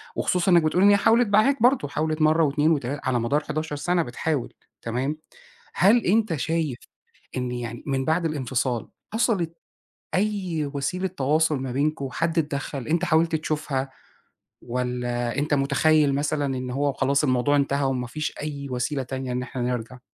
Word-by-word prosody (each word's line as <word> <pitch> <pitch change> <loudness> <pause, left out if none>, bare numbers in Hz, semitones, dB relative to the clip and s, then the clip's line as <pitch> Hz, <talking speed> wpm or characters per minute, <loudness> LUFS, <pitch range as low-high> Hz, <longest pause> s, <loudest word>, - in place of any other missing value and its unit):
وخصوصًا 180 +1 +1
إنك 170 -2 +6
بتقول 170 +4 +2
إن 200 - +7
هي 205 - +6
حاولت 230 +3 +4
معاك 215 +5 +3
برضه 245 - +4
حاولت 155 +2 -2
مرة 155 +1 +4
و2 150 +2 +2
و3 145 -1 -1
على 130 -2 +1
مدار 140 +6 0
11 155 0 -3
سنة 175 +4 +1
بتحاول 140 0 -3 0.3
تمام، 130 +6 -2 0.6
هل 220 +6 +4
أنت 215 -2 +2
شايف 155 -2 -1 0.6
إن 125 -1 -2
يعني 120 -1 -5
من 135 -2 -1
بعد 165 +2 +1
الانفصال 130 -5 -1 0.3
حصلِت 185 -8 0 0.6
أي 185 -7 -1
وسيلة 180 +7 -1
تواصل 155 -2 +1
ما 130 -1 -4
بينكم، 140 0 -1
حد 165 +4 -1
اتدخل، 140 -3 -3
أنت 170 +2 +1
حاولت 165 -1 +2
تشوفها، 150 -4 -2 0.7
والّا 120 0 -2
أنت 145 +1 0
مُتخيّل 140 +1 +3
مثلًا 145 0 0
إن 125 0 -4
هو 140 +1 0
خلاص 140 +1 +1
الموضوع 130 +1 +2
انتهى 140 0 +1
وما 130 -2 -1
فيش 155 +5 -4
أي 140 -2 -5
وسيلة 130 +2 -1
تانية 130 0 -5
إن 125 +1 -2
إحنا 125 0 -6
نرجع؟ 125 0 -3
145 Hz, 160 wpm, -24 LUFS, 130-165 Hz, 0.7 s, إن